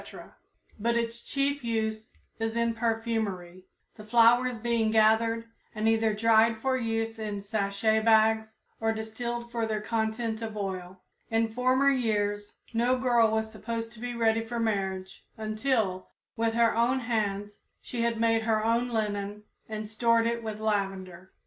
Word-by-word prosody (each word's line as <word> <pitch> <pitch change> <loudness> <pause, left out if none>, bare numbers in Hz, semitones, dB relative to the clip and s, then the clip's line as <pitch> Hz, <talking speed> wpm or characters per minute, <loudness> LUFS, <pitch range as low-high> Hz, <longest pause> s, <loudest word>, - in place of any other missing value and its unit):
but 235 +2 +1
its 235 0 -2
chief 280 0 -1
use 220 -1 -2 0.3
is 225 0 -2
in 235 0 +1
perfumery, 220 -6 -2 0.3
the 215 - -10
flowers 240 +2 +4
being 230 -1 +1
gathered 225 +1 +3 0.3
and 215 +1 0
either 225 0 +3
dried 225 +1 +4
for 260 +3 0
use 225 -2 -2
in 210 -2 -3
sachet 200 +1 0
bags 220 0 +3 0.2
or 225 0 +1
distilled 235 +2 -4
for 230 -2 -1
their 215 -1 -1
content 220 +1 -2
of 220 -1 -5
oil. 190 -2 -5 0.3
In 225 0 +1
former 255 +3 +3
years 205 -5 -1 0.2
no 240 +3 +2
girl 240 -3 +3
was 220 0 -1
supposed 225 +1 -5
to 225 - -12
be 245 +1 -4
ready 225 -1 +2
for 235 +1 -4
marriage 190 -4 -2
until, 215 -3 -1 0.3
with 225 0 0
her 230 -1 +3
own 245 +3 +2
hands, 205 -3 -2 0.2
she 240 - -5
had 230 -1 0
made 225 0 +3
her 220 -1 +1
own 235 +2 +1
linen 210 -2 -2 0.3
and 215 -1 -4
stored 230 +1 +2
it 235 0 -1
with 215 -2 -5
lavender. 195 -4 -2
225 Hz, 150 wpm, -28 LUFS, 215-230 Hz, 0.3 s, flowers